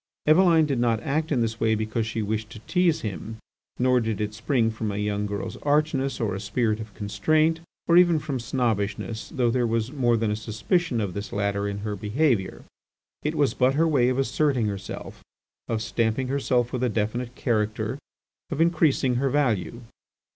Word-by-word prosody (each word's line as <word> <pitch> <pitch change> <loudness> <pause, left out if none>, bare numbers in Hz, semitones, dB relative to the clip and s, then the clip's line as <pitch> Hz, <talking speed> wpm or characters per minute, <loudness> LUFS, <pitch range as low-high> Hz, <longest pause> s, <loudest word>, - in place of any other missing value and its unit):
Eveline 165 0 +5
did 140 -4 -1
not 115 -2 +2
act 155 +2 -1
in 130 -5 +2
this 115 -1 -2
way 110 -1 +2
because 110 +1 -2
she 110 0 -2
wished 110 +1 -2
to 115 - -10
tease 180 +3 +1
him. 110 +1 -5 0.4
Nor 125 0 +3
did 110 -3 -2
it 105 0 -2
spring 115 +1 +1
from 110 -1 -3
a 100 - -4
young 105 0 -1
girl's 100 0 -4
archness, 145 -2 0
or 110 -5 -1
a 95 - -3
spirit 110 +2 0
of 110 -2 -9
constraint, 155 +11 +1 0.3
or 170 - +5
even 175 -2 +6
from 145 -3 -3
snobbishness, 115 -2 -2
though 120 -3 +1
there 120 -1 +1
was 115 +1 -1
more 120 -5 +2
than 110 -1 0
a - - 0
suspicion 115 - -1
of 100 -4 -3
this 100 +1 -5
latter 100 0 -1
in 100 0 -4
her 105 -1 -2
behaviour. 105 -1 0 0.6
It 150 +2 -2
was 145 -3 +2
but 130 +1 +2
her 165 +2 +3
way 130 -6 +3
of 130 - 0
asserting 135 -2 +1
herself, 100 -2 -6 0.4
of 110 -1 -1
stamping 115 +4 0
herself 130 -3 0
with 125 - -2
a 125 - +2
definite 115 +3 -2
character, 110 +1 -1 0.5
of 150 - -4
increasing 155 -6 +3
her 135 +2 +1
value. 120 -5 0
115 Hz, 185 wpm, -25 LUFS, 110-140 Hz, 0.6 s, even